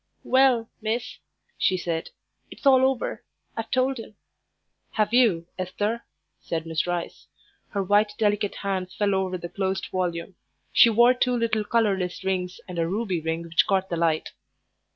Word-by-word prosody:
"Well, 260 -3 +4
miss," 225 +3 -3 0.4
she 185 - +2
said, 165 -2 -3 0.4
"it's - - -13
all 260 -1 +6
over. 265 -2 -3 0.3
I've 225 -1 -4
told 260 0 +1
him." 220 -2 -10 0.8
"Have 215 +1 +1
you, 215 -10 +4
Esther?" 205 +5 -2 0.3
said 165 -1 -4
Miss 160 +1 -1
Rice. 175 -1 -4 0.4
Her 200 -1 -1
white, 205 +2 +3
delicate 205 -1 +1
hands 190 -2 -3
fell 205 -1 +1
over 190 -1 0
the 175 - -6
closed 190 +1 -2
volume. 180 0 -2 0.4
She 235 - +7
wore 235 +3 +6
two 250 0 +1
little 225 -2 0
colourless 195 -5 0
rings 185 -1 -2
and 180 -2 -5
a 165 - +1
ruby 190 -2 -1
ring 160 +1 -2
which 165 0 +2
caught 190 -2 +1
the 170 - -1
light. 165 -2 0
195 Hz, 155 wpm, -25 LUFS, 180-225 Hz, 0.8 s, She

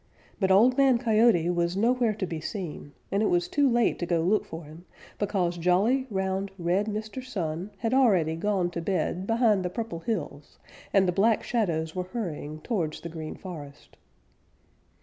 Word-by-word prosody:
But 190 -2 +1
Old 240 +8 +5
Man 270 -3 +5
Coyote 220 -7 +3
was 175 +1 0
nowhere 235 0 +2
to 195 - -2
be 165 -3 -5
seen, 155 -5 -6 0.2
and 200 - +1
it 215 - +3
was 175 0 +1
too 285 -2 +2
late 240 -1 +2
to 175 - -2
go 170 -2 +1
look 200 +6 +2
for 165 +1 -8
him, 155 +4 -13 0.3
because 185 -4 0
jolly, 205 +10 +2
round, 190 -1 -1
red 180 +4 0
Mr. 215 +4 -4
Sun 180 -6 -4
had 225 +4 -1
already 190 -12 +3
gone 185 0 0
to 170 - -4
bed 185 +1 -1
behind 225 -4 +3
the 180 - -1
Purple 220 -4 -5
Hills 165 -7 -5 0.3
and 195 -2 +4
the - - +3
Black 210 +5 +2
Shadows 165 -9 -1
were 180 0 -2
hurrying 160 -7 -5
towards 170 -9 -2
the 170 - -6
Green 160 -1 -6
Forest. 150 -7 -10
190 Hz, 175 wpm, -27 LUFS, 170-220 Hz, 0.3 s, Old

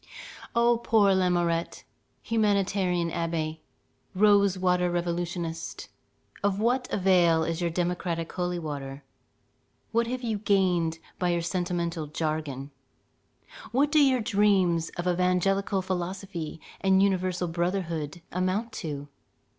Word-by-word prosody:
O 235 0 +4
poor 215 -4 +4
Lamourette! 175 -2 0 0.4
humanitarian 195 -5 +1
abbé, 160 -2 -2 0.6
rose 200 -1 +4
water 180 -1 +2
revolutionist, 175 -1 -3 0.5
of 200 -1 +1
what 250 +3 +1
avail 175 -4 +4
is 165 +1 -2
your 170 - +1
democratic 170 -1 -2
holy 180 -1 -2
water? 140 -4 -6 0.9
What 230 +1 +1
have 250 +1 -4
you 220 -3 -1
gained 180 -5 +2 0.2
by 180 - +1
your 170 -1 0
sentimental 170 -2 -2
jargon? 150 -3 -3 1.0
what 280 +5 +2
do 310 - +5
your 260 -3 +3
dreams 195 -6 +2
of 175 +1 -2
evangelical 185 +2 +1
philosophy 185 -2 -4 0.2
and 190 0 +4
universal 185 -2 0
brotherhood 170 -2 -2
amount 185 +6 -1
to? 145 -3 -5
180 Hz, 110 wpm, -27 LUFS, 170-200 Hz, 1.0 s, do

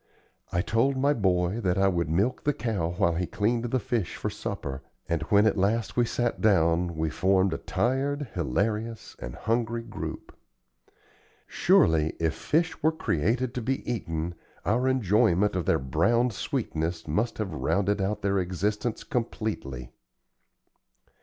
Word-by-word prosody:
I 85 0 +1
told 130 +6 +1
my 140 +2 +3
boy 95 -2 +1
that 90 -3 +1
I 95 0 +4
would 85 -4 0
milk 100 +10 +1
the 145 - +2
cow 100 -7 -2
while 85 -4 +3
he 90 +1 -1
cleaned 115 +3 0
the 120 +2 0
fish 110 -4 -2
for - - -3
supper, 65 0 -5 0.3
and 85 -1 0
when 105 -1 +5
at 105 -2 +2
last 110 +4 +1
we 120 - +3
sat 120 0 -1
down 85 -4 +3
we 80 0 -1
formed 95 +1 +2
a - - -3
tired, 140 +3 -1
hilarious, 105 - -2
and - - -6
hungry 115 +1 -1
group. - - -7 1.1
Surely, 80 -1 +3
if 80 -1 +1
fish 160 - 0
were 160 - +4
created 120 - 0
to 125 - -3
be 130 +4 -2
eaten, 85 -7 -2 0.3
our 120 +8 +2
enjoyment 105 -5 +3
of 90 -3 -2
their - - +4
browned 115 - +1
sweetness 80 -2 -3
must 105 +10 0
have 100 -6 -3
rounded 100 +5 0
out 105 +2 -2
their 100 -1 +2
existence 105 +5 -2
completely. 105 - -3
105 Hz, 150 wpm, -27 LUFS, 85-115 Hz, 1.1 s, when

